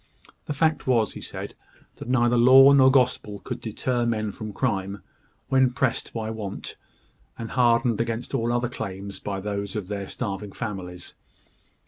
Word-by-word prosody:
The 145 - -3
fact 155 -2 +1
was, 115 -5 +2
he - - -8
said, - - -7 0.4
that - - -8
neither 120 -1 +3
law 130 +3 +8
nor 130 -1 +7
gospel 125 -6 +1
could - - -5
deter 120 +2 -1
men 110 -3 -1
from 110 +1 -7
crime, 100 -4 -2 0.5
when 130 -1 +4
pressed 125 +1 -1
by 110 -1 -4
want, 105 -3 -6 0.6
and 115 -1 -6
hardened 120 -2 +3
against 115 +2 -3
all 120 -3 0
other 120 0 +1
claims 100 -4 -6
by 100 -1 -4
those 100 0 -4
of 100 -3 -4
their 100 -2 -4
starving 100 -3 -5
families. 90 -6 -6
115 Hz, 155 wpm, -25 LUFS, 100-125 Hz, 0.6 s, law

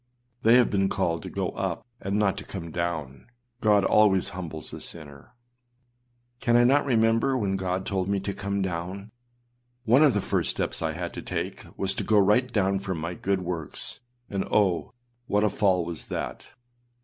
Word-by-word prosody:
â - - -35
They 115 - +8
have 125 -1 +5
been 95 -1 +2
called 85 -4 0
to - - -7
go - - -2
up - - -3 0.2
and 100 +1 -1
not 100 -2 +2
to - - -8
come 85 -4 -7
down. 80 -6 -3 0.3
God 105 -3 +4
always 100 -3 +4
humbles 80 -4 -7
a - - -7
sinner. 75 - -11 1.0
Can 120 -2 +3
I 120 - +6
not 140 +4 +4
remember 115 +2 +3
when 100 -5 0
Gold 95 0 -2
told 95 -1 -1
me 100 -1 +1
to 100 +1 -3
come 100 0 -2
down? 95 +4 -4 0.7
One 125 +4 +5
of 145 -6 +5
the - - +3
first - - 0
steps - - -2
I 80 -1 -1
had 85 +1 -5
to - - -6
take - - -4
was 95 0 0
to - - -3
go 110 - +3
right 105 +6 +4
down 100 -3 +1
from 95 -3 -3
my 85 +3 -3
good 95 +1 -1
works; 85 -4 -3 0.3
and 100 -1 -2
oh! 95 -5 +1 0.4
what 105 +1 +2
a 105 - +2
fall 95 -4 +2
was 85 -2 -6
that! - - -5
95 Hz, 190 wpm, -26 LUFS, 85-105 Hz, 1.0 s, They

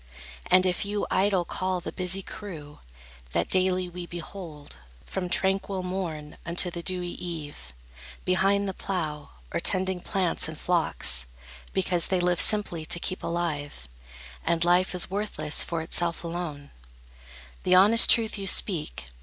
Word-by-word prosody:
And 185 0 +5
if 180 -1 +1
you 205 0 -2
idle 190 -2 +2
call 185 +1 -2
The 175 - -6
busy 185 +1 -1
crew, 155 -10 -9 0.5
that - - 0
daily 185 -1 +2
we 175 0 -7
behold, 170 - -8 0.3
From 185 -2 -4
tranquil 190 0 0
morn 170 -5 -4
unto 175 +1 +3
the 170 - -5
dewy 180 0 -1
eve, 150 - -7 0.5
Behind 195 +2 +2
the 190 - -2
plough, 155 -7 -4 0.2
or - - 0
tending 185 -1 +1
plants 185 -5 0
and 160 -1 -7
flocks, 110 - +1 0.4
Because 180 -2 +2
they 185 - +1
live 175 -1 +3
simply 205 -6 +2
to 165 +2 +1
keep 185 - -3
alive, 150 - -3 0.6
And 170 0 +1
life 180 +2 +3
is 180 - -1
worthless 200 -6 -1
for 165 -2 -3
itself 170 +1 -1
alone, 165 -4 -5 0.9
The 185 - +4
honest 210 +5 +6
truth 225 -2 +4
you 195 - -3
speak. 155 - +3
180 Hz, 145 wpm, -27 LUFS, 165-190 Hz, 0.9 s, honest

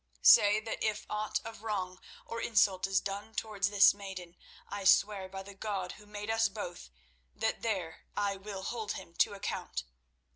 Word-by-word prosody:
Say 205 +1 +8
that 220 - -4
if 215 -1 -1
aught 210 0 -1
of 225 -2 -8
wrong 190 -4 -3 0.3
or 230 0 -5
insult 195 -4 +3
is 195 -1 +3
done 200 +3 -5
towards 205 -3 0
this 200 -2 +7
maiden, 190 -3 -8 0.3
I 205 -1 -5
swear 195 0 +4
by 190 0 -6
the 200 +1 -10
God 195 -2 -3
who 210 - -13
made 210 +1 -4
us 225 -1 +3
both 185 - -7 0.5
that 220 0 -1
there 190 -8 -3
I 200 -1 +1
will 195 0 -7
hold 220 -2 -3
him 170 - -9
to - - +3
account. 195 - -4
205 Hz, 175 wpm, -32 LUFS, 190-215 Hz, 0.5 s, Say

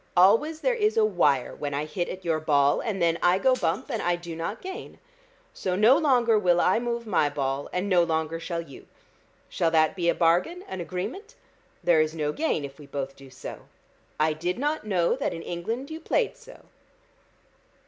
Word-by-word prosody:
Always 230 - +4
there - - +2
is 430 -2 +1
a 220 - +5
wire 150 -10 +2
when 145 -1 -4
I 145 +2 -1
hit 175 +3 -3
at 185 0 -7
your 160 -2 +1
ball, 145 -2 +3
and 215 -5 -3
then 170 -1 +2
I 175 +1 +4
go 260 +6 +3
bump, 255 - -1
and 230 - -2
I 175 0 +1
do 175 -1 -8
not 165 +7 -4
gain. 375 0 -8 0.6
So 185 -1 -2
no 215 +7 +6
longer 245 -7 +3
will 175 -3 +3
I 185 +5 +3
move 235 -1 -3
my 175 -8 +2
ball, 140 -1 -2
and 180 +2 -2
no 180 -3 +4
longer 160 -1 -1
shall 170 0 -3
you. 140 -5 -13 0.6
Shall 165 - 0
that 160 +1 +3
be 175 -2 +1
a 170 - +2
bargain, 180 - +2
an 190 -1 -5
agreement? 190 - -6 0.5
There 165 -3 +4
is 155 +1 -1
no 150 -2 -1
gain 225 - -1
if 140 +1 -11
we 145 - -12
both 135 -1 -5
do 135 -1 -14
so. 130 - -9 0.5
I 155 0 +3
did 175 +4 -3
not 295 -2 -2
know 180 -2 +2
that 270 - -2
in 165 - -7
England 225 - -4
you 315 - -5
played 475 +7 0
so." - - -15
175 Hz, 200 wpm, -26 LUFS, 155-230 Hz, 0.6 s, no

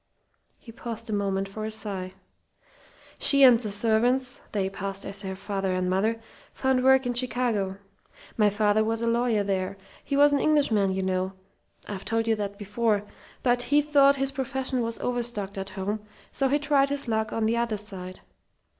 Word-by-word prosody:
He 230 - -13
paused 230 0 -7
a - - -1
moment 195 -1 -1
for 215 +2 -7
a 215 - -2
sigh. 200 -4 -4 1.0
"She 280 -1 +5
and 245 -3 +8
the 220 -3 -4
servants 235 +5 +1
they 200 -3 0
passed 195 0 -5
as 195 0 -6
her 190 -2 -5
father 195 -1 -2
and 185 0 0
mother 220 +5 +1 0.4
found 265 -1 +1
work 265 0 +5
in 245 - 0
Chicago. 240 -6 -1 0.6
My 210 -2 +4
father 210 +1 +2
was 225 +1 -1
a - - 0
lawyer 230 -2 +2
there. 195 0 -2 0.3
He 280 - -2
was 290 0 +6
an 285 - +3
Englishman, 235 -11 +3
you 190 0 -2
know 185 0 -1 0.5
I've 195 -2 -6
told 225 0 -1
you 225 - +4
that 200 -1 -4
before 210 0 0 0.4
but 245 -1 +2
he 285 +4 +3
thought 280 -1 +4
his 270 0 0
profession 265 -1 -2
was 230 0 -2
overstocked 235 -5 -2
at 195 0 -5
home, 205 +3 -2 0.3
so 270 - 0
he 280 +2 +2
tried 285 -2 +2
his 280 -2 -3
luck 220 -1 0
on 225 - -1
the 230 +2 +1
other 235 -2 0
side. 190 -3 -9
220 Hz, 180 wpm, -26 LUFS, 200-250 Hz, 1.0 s, and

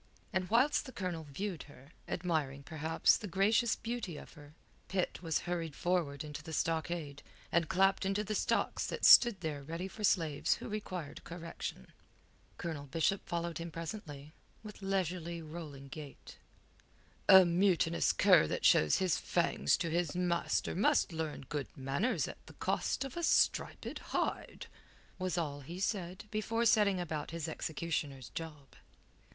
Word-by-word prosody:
And 185 -1 -1
whilst 265 +6 +3
the - - -7
Colonel 180 -7 -4
viewed 175 +4 -4
her, 140 +1 -16 0.2
admiring, 155 -6 -2
perhaps, 160 +1 +2
the 210 - -6
gracious 210 +5 +3
beauty 225 -8 -4
of - - -11
her, 150 -1 -15 0.3
Pitt 185 -2 -2
was 165 -3 0
hurried 165 -4 -3
forward 165 -6 0
into 150 -1 -7
the 160 0 -8
stockade, 160 -3 -2 0.3
and 165 -2 +2
clapped 195 +2 +3
into 195 +2 0
the 215 - -3
stocks - - 0
that - - -2
stood 235 -7 +8
there 155 -4 -3
ready 165 +6 -5
for 210 +2 -9
slaves 160 -7 +2
who - - -8
required 185 -8 -5
correction. 165 - -6 0.7
Colonel 155 -5 -5
Bishop 165 +7 0
followed 170 -1 -2
him 170 +1 -5
presently, 160 -4 -7 0.3
with 210 -2 -10
leisurely, 180 -3 -2
rolling 155 -4 -8
gait. 140 0 -10 0.9
"A 190 -1 +10
mutinous 170 -1 +3
cur - - +5
that - - -2
shows 75 - +5
his 185 -3 +1
fangs 70 - +1
to 170 -2 -2
his 170 -1 0
master 175 -1 0
must 190 -1 +3
learn 160 -2 -3
good 145 -2 -3
manners 140 - 0
at - - -10
the - - -12
cost - - -1
of 270 - -7
a 345 - -3
striped 335 - +1
hide," - - -3 0.5
was 185 -1 -1
all 145 -4 -2
he 170 +6 -8
said 190 -2 -2
before 225 +2 0
setting 205 -4 +4
about 155 -4 -3
his 165 -1 -4
executioner's 150 -6 -3
job. 150 -2 -7
170 Hz, 150 wpm, -33 LUFS, 150-190 Hz, 0.9 s, A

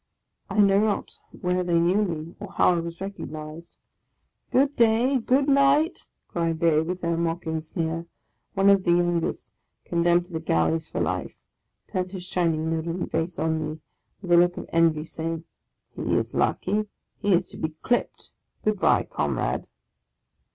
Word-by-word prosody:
I 200 - -4
know 200 -1 +5
not 210 -1 -1 0.2
where 180 0 +1
they 175 -1 +1
knew 180 +5 +3
me, 165 -3 -4
or 205 -1 -8
how 180 - +4
I - - 0
was 170 +1 -6
recognized. 160 -4 -7 0.4
" - - -48
Good 280 +2 +3
day! 235 +4 +3
good 265 +4 +2
night! 280 +4 +3
" - - -54
cried 165 -1 -1
they, 165 -2 +4
with 180 +3 -4
their 170 0 0
mocking 165 -1 -2
sneer. 165 +1 -3 0.5
One 195 +1 +5
of 195 -1 +4
the 175 - -1
youngest, 175 -1 0 0.3
condemned 175 0 +2
to 175 - -16
the 160 - -1
Galleys 80 - +1
for - - -4
life, - - -2 0.6
turned 185 +1 -2
his 185 -2 -6
shining, 165 -3 0
leaden 165 +2 -3
face 165 +2 -2
on 160 0 0
me, 155 +1 -5 0.4
with 180 - -4
a 170 - +7
look 175 +1 +4
of - - -5
envy, 165 -2 +3
saying, 165 0 -4 0.3
" - - -47
He - - -1
is - - -1
lucky! 210 +3 0 0.3
he 200 -2 +3
is 180 +1 +1
to - - -9
be 160 0 -3
clipped! 245 - -1 0.3
Good 215 -2 +1
bye, - - +4
Comrade - - -2
175 Hz, 170 wpm, -25 LUFS, 165-195 Hz, 0.6 s, a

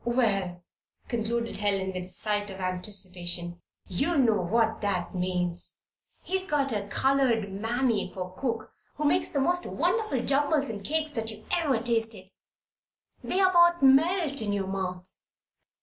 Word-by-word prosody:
Well," 200 -8 0 0.5
concluded 230 0 -2
Helen, 195 -2 0
with 180 -1 -4
a - - -14
sigh 205 +3 0
of 195 -2 -8
anticipation, 180 -2 -1 0.3
"you'll 275 - 0
soon 270 -4 +4
know 215 -4 +2
what 220 +4 +1
that 200 -4 -1
means. 180 -1 -2 0.5
He's 380 0 -1
got 275 -4 +1
a 205 -1 -2
colored 245 -5 +1
Mammy 225 0 0
for 185 -1 -6
cook 230 -2 -3 0.2
who 300 - -3
makes 290 - +2
the 280 - -1
most 355 +6 +2
wonderful 430 - 0
jumbles 285 +1 +2
and 205 -2 -7
cakes 310 +4 -1
that 225 -5 -3
you 215 0 -10
ever 310 -8 +2
tasted 225 -5 0 0.9
they 375 - -1
about 345 -4 +5
melt 285 +1 +4
in 205 -2 0
pour 200 -1 -1
mouth!" 185 -1 -4
225 Hz, 150 wpm, -27 LUFS, 190-275 Hz, 0.9 s, about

